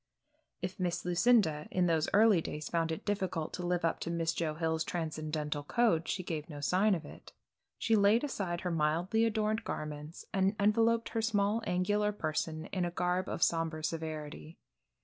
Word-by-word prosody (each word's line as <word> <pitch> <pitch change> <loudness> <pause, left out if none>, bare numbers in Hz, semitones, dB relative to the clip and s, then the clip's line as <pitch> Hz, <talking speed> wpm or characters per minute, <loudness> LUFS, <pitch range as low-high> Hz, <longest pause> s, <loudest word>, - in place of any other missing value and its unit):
If 185 +2 -4
Miss 175 -2 -1
Lucinda, 180 -4 +3
in 180 -1 +1
those 160 -3 +1
early 210 -4 +5
days 150 -2 -5
found 165 -1 0
it 160 - -5
difficult 190 -6 -2
to 180 - -4
live 175 -1 0
up 165 - 0
to - - -4
Miss 165 -1 0
Joe 160 -2 -2
Hill's 160 0 0
transcendental 155 -3 -3
code 165 0 +1
she 185 - -2
gave 160 -3 -4
no 145 -2 -7
sign 185 +8 +3
of 165 - -6
it. - - -13 0.4
She 225 - +2
laid 210 +4 +4
aside 185 -11 -2
her 180 - -2
mildly 170 +8 +1
adorned 220 0 0
garments 150 +1 -6
and 195 +1 +2
enveloped 225 +3 +3
her 225 - -1
small 215 0 +1
angular 205 +4 +1
person 155 -3 -3
in 185 -2 0
a 175 - 0
garb 180 +2 -1
of - - -1
sombre 165 -1 0
severity. 155 0 -5
175 Hz, 175 wpm, -32 LUFS, 160-205 Hz, 0.4 s, early